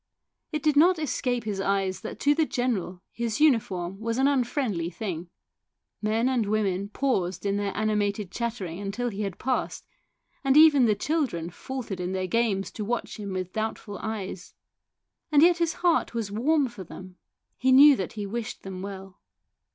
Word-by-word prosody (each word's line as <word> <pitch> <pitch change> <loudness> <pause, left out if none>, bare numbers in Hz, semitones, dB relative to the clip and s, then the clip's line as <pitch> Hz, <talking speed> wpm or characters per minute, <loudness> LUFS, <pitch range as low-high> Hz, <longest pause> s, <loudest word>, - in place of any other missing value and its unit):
It 305 -3 -3
did 305 -2 +3
not 345 +5 +6
escape 250 -5 -1
his 205 -3 -3
eyes 195 -1 0
that 220 - -7
to 290 - +4
the 315 0 +1
general 210 - -2
his 235 -2 -3
uniform 195 - +2
was 230 +1 -2
an 265 +1 +4
unfriendly 245 - 0
thing. 175 -2 -5 0.7
Men 220 +3 +1
and 245 -5 +1
women 200 -2 0
paused 195 -8 -1
in 200 0 +1
their 205 -1 -1
animated 210 -2 0
chatter 235 -4 -3
ing 180 +4 -5
till 245 +4 -2
he 205 -1 -5
had 195 -3 -3
passed, 260 0 -2 0.6
and 270 +1 +4
even 300 -5 +7
the 215 -2 +3
children 225 - -1
faltered 235 -2 -6
in 180 +1 -3
their 185 0 -1
games 200 -1 0
to 215 - -5
watch 240 +3 -3
him 200 -2 -5
with 185 -1 -4
doubtful 220 -1 -4
eyes. 200 -4 -5 0.8
And 295 0 +6
yet 345 0 +5
his 335 -1 +1
heart 335 -8 +2
was 220 -4 -2
warm 275 +7 +2
for 230 -5 -9
them; 185 +1 -11 0.4
he 260 +1 +2
knew 280 +2 +9
that 190 -7 -4
he 210 -2 -4
wished 225 +2 -5
them 190 -1 -6
well. 195 -1 -8
215 Hz, 175 wpm, -26 LUFS, 195-260 Hz, 0.8 s, knew